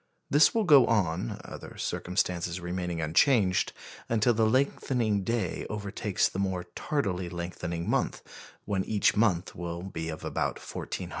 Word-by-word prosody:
This 145 +8 +5
will 225 - +3
go 145 -8 +7
on 95 - 0
(other - - -9
circumstances 90 -1 -1
remaining 90 -1 -3
unchanged) 90 - +3 0.4
until 115 +1 +3
the 110 0 +3
lengthening 120 -4 +1
day 115 -5 -2
overtakes 100 -1 -1
the 95 - -5
more 95 -2 -1
tardily 95 - -1
lengthening 85 -1 -4
month, - - 0 0.4
when 100 -2 0
each 105 -2 +2
will 90 -4 0
be 80 -4 -5
of 80 - -6
about - - -1
1,400 - - -7
hours. - - -5
95 Hz, 140 wpm, -29 LUFS, 85-115 Hz, 0.4 s, go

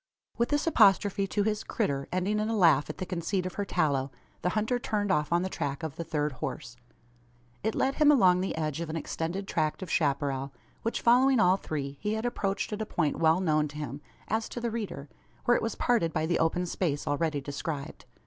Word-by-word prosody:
With 235 - 0
this 290 0 +1
apostrophe 200 - +4
to 205 +1 0
his 215 0 -1
"critter," 140 -11 -1
ending 190 +4 0
in 215 +1 -1
a 225 - 0
laugh 165 -7 +4
at 155 - -5
the 185 - -4
conceit 180 +1 -2
of 185 - -4
her 205 - -2
"tallow," 140 -8 +1 0.3
the 180 - +1
hunter 225 +4 +1
turned 205 -4 -1
off 150 -4 +1
on 170 +1 +3
the - - -1
track 140 -5 -3
of 155 -2 -4
the 170 - -4
third 150 -2 -1
horse. 125 -1 -6 0.9
It 220 - -1
led 270 - +1
him 300 0 +4
along 185 -10 +5
the 190 - -2
edge 155 -1 -2
of 165 - -4
an 160 - -4
extended 165 +4 -3
tract 155 +2 -1
of 185 - -7
chapparal; 140 -2 0 0.3
which, 230 - -2
following 255 +2 +5
all 180 -1 +5
three, 140 -7 -5
he 210 +1 -1
had 220 +2 -3
approached 200 -3 -1
at 210 - -3
a - - -1
point 155 -4 0
well 160 +1 +4
known 155 -4 +2
to 150 +1 -10
him, 145 -1 -5 0.3
as 220 +1 -1
to - - -5
the 235 -1 -2
reader, 210 -10 -5 0.4
where 240 -1 +5
it - - +1
was 225 - -2
parted 230 -10 +1
by 155 -1 0
the 170 +1 +1
open 170 +2 +1
space 165 -4 -2
already 150 0 0
described. 140 +1 -5
180 Hz, 220 wpm, -29 LUFS, 150-210 Hz, 0.9 s, along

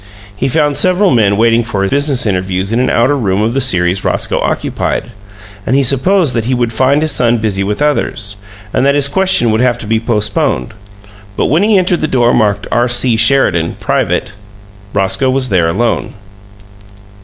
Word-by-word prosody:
He 105 - -2
found 145 +1 0
several 185 +2 +3
men 105 -5 +2
waiting 115 +1 +2
for 100 -4 -2
business 140 +1 0
interviews 95 0 -2
in 115 - +1
an 130 - +1
outer 130 +5 +2
room 105 -6 -1
of 115 +2 -1
the 135 - 0
series 90 -6 +1
Roscoe - - -1
occupied; 120 - -3 0.5
and 125 - -1
he 140 - +3
supposed 140 +5 +1
that 115 -2 -2
he 130 +1 0
would 120 -2 -1
find 135 +6 +1
his 155 - 0
son 120 -3 +1
busy 105 -3 -2
with 105 +8 -2
others, 115 -8 -2 0.4
and - - +1
that 140 +1 +2
his 145 -1 +3
question 185 -7 +2
would 110 +2 0
have 125 -1 +1
to - - -9
be 110 +1 0
postponed, 115 +3 -1 0.6
but - - +1
when 160 +5 +2
he 210 0 +3
entered 180 -1 0
the 155 - 0
door 120 -4 +1
marked 105 -3 0
"R. 120 +1 +1
C. 120 0 +1
Sheridan. 110 -8 +2
Private," - - -1 0.6
Roscoe 100 +7 0
was 130 0 0
there 90 -5 +1
alone. 115 +6 -2
120 Hz, 185 wpm, -12 LUFS, 105-140 Hz, 0.6 s, several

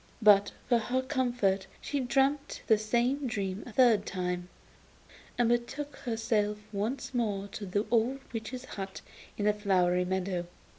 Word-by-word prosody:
But 205 -1 +7 0.2
for 240 -2 +4
her 255 +3 -1
comfort 245 -8 0
she 285 - -2
dreamt 275 +3 +1
the 220 -2 +4
same 240 +6 +1
dream 200 -4 -2
a - - -8
third 225 -3 +5
time, 180 -1 -3 0.9
and 240 -1 +3
betook 255 +5 -1
herself 225 -3 0 0.2
once 230 +7 -2
more 205 -5 -1
to 205 0 -6
the 205 +4 0
old 240 +3 +2
witch's 235 +3 -5
hut 195 -4 -6 0.4
in 205 - -1
the 210 - +4
flowery 180 -3 +2
meadow. 185 -1 -1
220 Hz, 145 wpm, -30 LUFS, 195-245 Hz, 0.9 s, But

